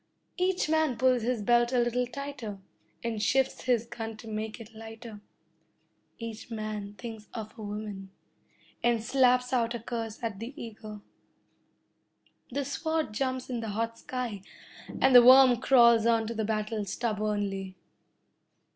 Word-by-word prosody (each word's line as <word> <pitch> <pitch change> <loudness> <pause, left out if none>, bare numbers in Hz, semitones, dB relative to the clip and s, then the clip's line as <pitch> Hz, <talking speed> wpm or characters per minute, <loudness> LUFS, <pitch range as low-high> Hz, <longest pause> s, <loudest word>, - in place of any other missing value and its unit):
Each 365 -2 +1
man 315 -5 +1
pulls 255 0 +3
his 235 -1 -1
belt 240 +2 +3
a 255 - +1
little 240 +1 +1
tighter, 250 -5 -6 0.5
and 225 -2 -2
shifts 265 +4 +1
his 240 -3 +2
gun 225 -2 -6
to 225 - -12
make 215 +1 -4
it 225 0 -11
lighter. 225 -1 -10 1.0
Each 230 0 -7
man 215 -2 -5
thinks 220 -2 -8
of 220 -1 -6
a 225 - -10
woman, 205 -2 -6 0.7
and 235 -2 +2
slaps 250 0 +3
out 235 -1 +1
a - - -4
curse 225 -1 -5
at 215 -4 -3
the 250 +7 -7
eagle. 215 -2 -9 1.5
The 280 +2 -2
sword 315 -2 -2
jumps 260 +2 -2
in 245 -2 -3
the 225 -1 -4
hot 230 0 -2
sky, 245 -6 -4 0.6
and 265 - +4
the 245 - +11
worm 255 0 +8
crawls 235 -3 +5
on 230 -1 +3
to 230 - -4
the 220 -1 -2
battle, 215 0 -1
stubbornly. 205 -3 -2
230 Hz, 145 wpm, -29 LUFS, 215-250 Hz, 1.5 s, the